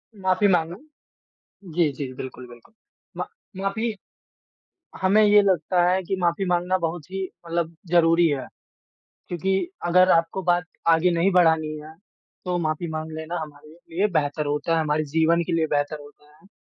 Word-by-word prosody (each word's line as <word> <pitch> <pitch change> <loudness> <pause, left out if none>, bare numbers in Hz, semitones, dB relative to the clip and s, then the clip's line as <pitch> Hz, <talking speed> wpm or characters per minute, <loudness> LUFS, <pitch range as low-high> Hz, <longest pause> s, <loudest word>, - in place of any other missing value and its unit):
माफ़ी 190 0 +2
माँगना, 175 -2 +1 1.0
जी, 170 -3 +3
जी 135 -2 -6
बिल्कुल, 125 -1 -8
बिल्कुल। 120 - -17 0.4
मा - - -3 0.3
माफ़ी 210 +4 -2 1.1
हमें 200 +3 +4
ये 210 0 +6
लगता 180 -2 +2
है 185 +1 +2
कि 190 +2 -2
माफ़ी 175 +2 0
माँगना 180 +1 +1
बहुत 165 -2 -4
ही 195 0 -3 0.2
मतलब 170 0 -2 0.2
ज़रूरी 170 0 +5
है, 145 -4 -2 0.8
क्योंकि 190 +2 0 0.3
अगर 185 +1 +5
आपको 165 +3 -2
बात 175 0 +2 0.2
आगे 165 +2 +4
नहीं 170 +3 +2
बढ़ानी 160 -4 +3
हैं, 155 +1 -12 0.5
तो 180 -1 -1
माफ़ी 160 0 -2
माँग 155 0 -5
लेना 160 +2 -4
हमारे 150 -1 -10 0.3
लिए 200 +4 +3
बेहतर 145 +1 -3
होता 150 +3 -1
है, - - +2
हमारे 155 0 0
जीवन 165 +1 +3
के - - -1
लिए 160 -1 +1
बेहतर 145 +1 -1
होता 150 +1 -18
है। 195 - -22
170 Hz, 160 wpm, -24 LUFS, 155-185 Hz, 1.1 s, ये